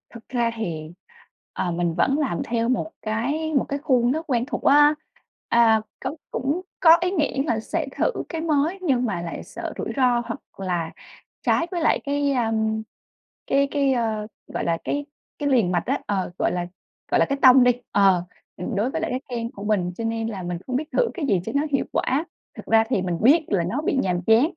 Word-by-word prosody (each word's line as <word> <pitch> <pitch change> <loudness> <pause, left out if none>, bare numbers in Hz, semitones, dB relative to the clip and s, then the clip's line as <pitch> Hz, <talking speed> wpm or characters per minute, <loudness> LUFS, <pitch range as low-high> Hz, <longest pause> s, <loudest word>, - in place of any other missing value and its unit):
Thực 235 -1 -13
ra 240 -2 +1
thì, 165 -8 -4 0.6
ờ, 175 - -2
mình 170 0 0
vẫn 265 +11 +2
làm 265 - -1
theo 230 0 -1
một 255 +5 0
cái 275 +9 -2
một 275 - +2
cái 280 - -2
khuôn 255 -5 +2
rất 315 +4 -1
quen 240 -2 +1
thuộc 290 - -5
á. 295 +2 +6 0.5
A, 225 -2 +5 0.2
có - - -4 0.2
cũng 280 +8 -1 0.2
có 330 -1 +8
ý 360 +1 +1
nghĩ 290 -6 0
là 225 - +1
sẽ 305 +7 -3
thử - - +2 0.2
cái 325 -2 -3
mới 320 +3 +1
nhưng 260 -8 +1
mà 195 -7 -2
lại 170 -1 -6
sợ - - -7
rủi - - -3
ro 250 -2 +3
hoặc - - -5 0.2
là 175 -4 -2 0.5
trái 335 - +2
với 350 -2 -2
lại 320 - +3
cái, 285 0 +1
a, 240 -4 +1 1.0
cái 280 0 +3
cái, 280 -2 +2
ơ, 220 -3 -1 0.2
gọi - - -4
là, 165 -1 +1
cái 290 0 -2 0.3
cái 290 -1 0
liền 230 -9 +3
mạch 175 -2 0
á - - 0
ờ, 195 -3 -1
gọi - - +2
là, 175 -1 -2 0.5
gọi - - +4
là, - - +5
cái 275 - -2
tông 255 -1 +8
đi, 250 - +6 0.2
ờ, 195 -3 +4 0.3
ừm, 240 - -4
đối 220 +6 0
với - - -2
lại - - -2
cái 255 +1 -2
kênh 235 -1 -3
của 200 - -9
mình 200 -4 0
cho 230 - -4
nên 225 0 -1
là 200 -5 -5
mình 175 0 -3
hông 255 - -2
biết 305 +3 -5
thử 485 - +2
cái 340 -6 -3
gì 195 -9 +2
cho - - -3
nó 280 - +3
hiệu 275 - +1
quả. 285 +6 0 0.3
Thực - - -9
ra 225 0 +4
thì 225 -7 +1
mình 180 -2 -2
biết 295 +8 +5
là 190 -4 +1
nó 225 - -2
bị 310 - 0
nhàm 180 -2 0
chán, 225 +3 +6
245 Hz, 220 wpm, -23 LUFS, 205-285 Hz, 1.0 s, có